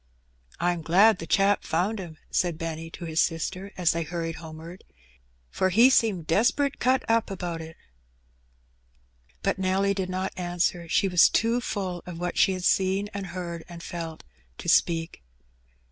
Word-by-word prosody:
'^Pm 175 -1 0
glad 190 +6 +5
the 165 - -6
chap 200 +2 +3
found 190 +7 -1
'im,^^ 170 -4 -8
said 175 -3 0
Benny 165 0 -5
to 170 +1 -8
his 160 -1 +1
sister, 185 +4 -2
as 175 -2 +3
they 170 - -2
hurried 165 0 -4
homeward, 165 +2 -10 0.7
"for 185 - +1
he 235 +8 +6
seemed 205 -10 +2
desperate 250 - +1
cut 260 +1 +1
up 230 0 +2
^out 175 -4 -4
it.^^ 160 0 -9 1.7
But - - 0
Nelly 190 +1 +1
did 190 -2 -3
not 185 +1 -3
answer; 175 -1 -1
she 195 - +2
was 180 -2 +6
too 230 +2 +1
full 185 -6 -3
of 175 -2 -7
what 175 +1 -3
she 190 - +4
had 185 -1 -5
seen, 195 +3 +1
and 200 -1 -5
heard, 170 -2 -6
and 170 -1 -9
felt, 165 -2 -6 0.3
to - - -8
speak. 165 - +2
180 Hz, 160 wpm, -26 LUFS, 165-195 Hz, 1.7 s, he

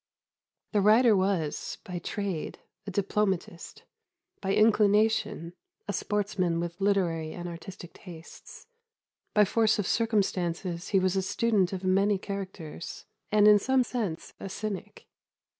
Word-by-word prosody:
The 210 - +2
writer 220 +2 +6
was, 185 -6 -1
by 180 -2 -5
trade, 195 -2 -4 0.3
a - - -2
diplomatist; 195 -3 -2 0.6
by 195 0 0
inclination, 210 -5 +3 0.3
a - - -2
sportsman 195 -5 -1
with 170 +2 -5
literary 175 -6 +1
and 175 0 -6
artistic 175 +1 -9
tastes; 170 -3 -12 0.7
by 210 -1 +6
force 220 +1 +2
of 205 - -1
circumstances 180 -6 -1
he 200 - +2
was 185 0 +1
a 190 - +2
student 195 -1 +1
of 190 -1 -5
many 195 +2 +3
characters, 190 -5 -7 0.3
and 210 0 +5
in 210 -1 +8
some 260 +4 +2
sense 215 -10 -4
a 195 - -6
cynic. 210 0 -6
195 Hz, 125 wpm, -28 LUFS, 175-210 Hz, 0.7 s, in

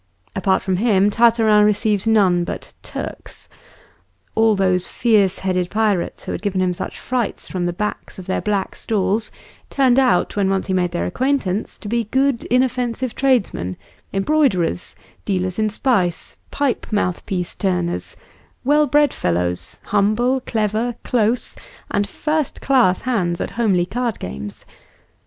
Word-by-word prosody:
Apart 190 0 +1
from 190 -2 0
him, 205 -2 +3
Tartarin 225 -2 +4
received 210 0 +1
none 190 -6 +4
but - - -6
"Turks." - - -8 0.9
All 220 -1 +4
those 185 -2 +1
fierce 205 -5 +2
headed 185 -2 -1
pirates 210 -4 0
who - - -4
had - - -4
given 200 -2 -1
him 185 -1 +1
such - - -6
frights 250 -4 -2
from 180 -2 -2
the - - 0
backs 210 +4 -4
of 185 - -8
their 190 - -1
black 205 -2 -1
stalls 215 0 0 0.4
turned 265 -2 +3
out, 260 -2 +2
when 200 -2 +1
once 195 0 0
he 190 - -2
made 180 -1 +1
their 170 0 -2
acquaintance, 245 -4 -1
to - - -9
be 235 +1 0
good 265 +2 +1
inoffensive 250 -1 0
tradesmen, 205 - 0 0.3
embroiderers, 195 - +1 0.3
dealers 185 -1 -1
in 215 0 +2
spice, 200 -7 0
pipe 285 -3 -1
mouthpiece 180 -2 -1
turners 180 -3 -2 0.5
well 295 +3 +3
bred 290 0 +3
fellows, 90 0 -2
humble, 215 +6 +2
clever, 220 +2 0
close, 235 0 0 0.4
and 205 0 0
first 305 +2 -2
class 245 -10 +3
hands 185 -9 0
at - - -3
homely 200 -7 +1
card 240 +2 -2
games. 90 +5 -7
210 Hz, 140 wpm, -20 LUFS, 185-240 Hz, 0.9 s, Tartarin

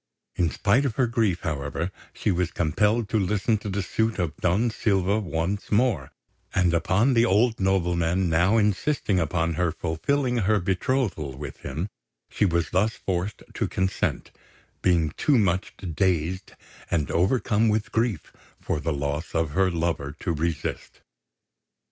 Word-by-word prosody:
In 85 -2 +2
spite 105 - +2
of 130 -6 -1
her 130 - +3
grief, 115 -7 0
however, 80 +1 -3 0.2
she 105 - -1
was 90 -1 0
compelled 105 +8 +1
to 110 - +1
listen 105 +3 +1
to 105 - -6
the 100 0 -1
suit 110 +4 0
of 85 -5 -2
Don 100 +7 +1
Silva 100 -1 +1
once 95 +1 -3
more; 105 - +1 0.4
and 90 -2 +3
upon 95 +9 +2
the 115 -1 +4
old 115 +3 +2
nobleman 90 -1 +1
now 85 +7 +3
insisting 105 0 +1
upon 85 0 0
her 85 +1 0
fulfilling 125 - -1
her 105 -1 +2
betrothal 90 - -1
with 75 - -7
him, 85 +5 -4 0.4
she - - +2
was 85 -3 0
thus 105 +5 +1
forced 95 +2 -3
to - - -1
consent, 95 0 -1 0.5
being 85 -4 +2
too 145 -4 +3
much 95 -4 +1
dazed 90 +1 -1 0.4
and 75 -5 0
overcome 110 +4 +2
with 105 0 0
grief 110 -8 -1 0.3
for - - -2
the 80 +2 -2
loss 75 +3 -3
of 80 -2 +1
her 95 +5 +2
lover 80 -4 -2
to 85 - -1
resist. 80 0 -3
95 Hz, 150 wpm, -25 LUFS, 85-105 Hz, 0.5 s, the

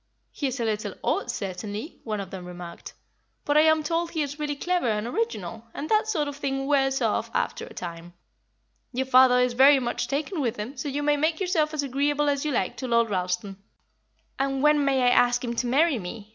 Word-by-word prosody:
"He 285 - -2
is 260 0 -4
a 230 - 0
little 215 -1 -2
odd, - - 0
certainly," 205 - -5
one 215 -2 -3
of 195 -2 -6
them 185 -2 -7
remarked, 175 -1 -9 0.5
"but 290 - +1
I 305 - +7
am 315 0 +4
told 330 +2 -1
he 320 -3 -1
is 290 +1 -6
really 295 -1 -2
clever 355 -1 0
and 210 -1 0
original, 230 - -3
and 300 - -5
that 430 0 +3
sort 320 -9 0
of 285 - -5
thing 270 -1 -2
wears 270 -1 +2
off - - 0
after 470 0 -1
a - - -12
time. 170 0 -7 0.8
Your 260 +2 -1
father 255 -1 +6
is 250 -1 +2
very 270 +3 +7
much 240 -1 -2
taken 305 +4 -2
with 235 -5 -1
him, 220 +7 -6
so 275 +2 -4
you 290 +2 -2
may 295 0 +3
make 315 +2 0
yourself 345 -5 +1
as 305 -2 -2
agreeable 285 +2 +1
as 280 -1 0
you 305 - -1
like 190 -8 -1
to 260 - -4
Lord 235 -2 +2
Ralston." 180 +1 -2 0.8
"And 270 0 0
when 300 -1 +4
may 270 -2 +2
I 245 - +5
ask 245 0 +3
him 235 -1 -3
to 245 - 0
marry 285 +1 +3
me?" 205 +3 -8
270 Hz, 220 wpm, -26 LUFS, 225-295 Hz, 0.8 s, I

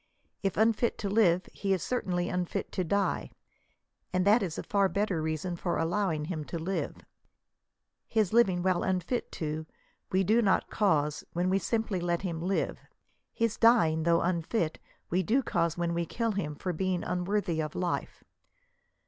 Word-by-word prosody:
If 195 -2 -1
unfit 225 +2 +2
to 200 - -3
live, 185 -4 +3
he 195 -1 0
is 185 - -1
cer 250 - -1
tainly 175 -1 -1
unfit 180 -1 -2
to 185 - -1
die, 200 +3 0 0.8
and 185 0 +1
that 210 +4 +5
is 175 -5 -3
a - - -3
far 200 -2 +2
better 200 -5 0
reason 160 +3 -2
for 170 +1 -2
allowing 165 -2 0
him 160 -2 -4
to 170 - -5
live. 180 +4 -3 1.1
His 215 -3 +1
living 190 -7 +4
while 185 -2 +2
unfit 190 +6 -1
to, 155 0 -4 0.4
we 190 +1 +3
do 220 +5 +4
not 195 -4 +2
cause^ 150 -8 +1
when 180 +2 +1
we 195 - +3
simply 220 0 -1
let 175 +1 -1
him 170 -4 -3
live. 190 +3 -1 0.5
His 230 -1 0
dying, 220 -10 +5
though 170 +1 +3
unfit, 170 0 -1 0.3
we 180 +2 +3
do 240 +9 +2
causOt 170 -6 0
when 170 -1 0
we 170 0 -1
kill 230 -1 -1
him 165 -8 -3
for 180 +4 -3
being 185 +1 -1
unworthy 180 -2 -1
of 155 -1 -5
life. 180 -1 -3
185 Hz, 170 wpm, -29 LUFS, 170-200 Hz, 1.1 s, that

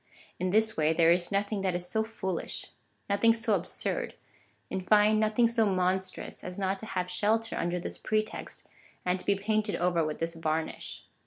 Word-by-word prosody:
In 185 - 0
this 220 +3 +2
way 155 0 +2
there 165 0 +5
is 175 +1 +2
nothing 200 +1 0
that 190 -2 0
is 175 0 -3
so 220 +3 0
foolish, 190 -5 -3 0.4
nothing 225 +3 +4
so 225 -1 0
absurd 185 -3 -2 0.3
— - - -38
in 190 - -1
fine, 210 +2 +4
nothing 220 +2 +3
so 230 -2 +2
monstrous, 185 0 -1
as 180 0 -6
not 195 0 -1
to 220 - -6
liave 180 -3 -2
shelter 220 +5 +1
under 175 +1 -1
this 175 - -4
pretext, 215 0 -2 0.4
and 180 +1 +1
to - - -6
be 200 - +4
painted 215 +1 0
over 175 -1 +2
with 155 -1 -2
this 165 0 -2
varnish. 160 -1 -3
190 Hz, 185 wpm, -29 LUFS, 180-215 Hz, 0.4 s, there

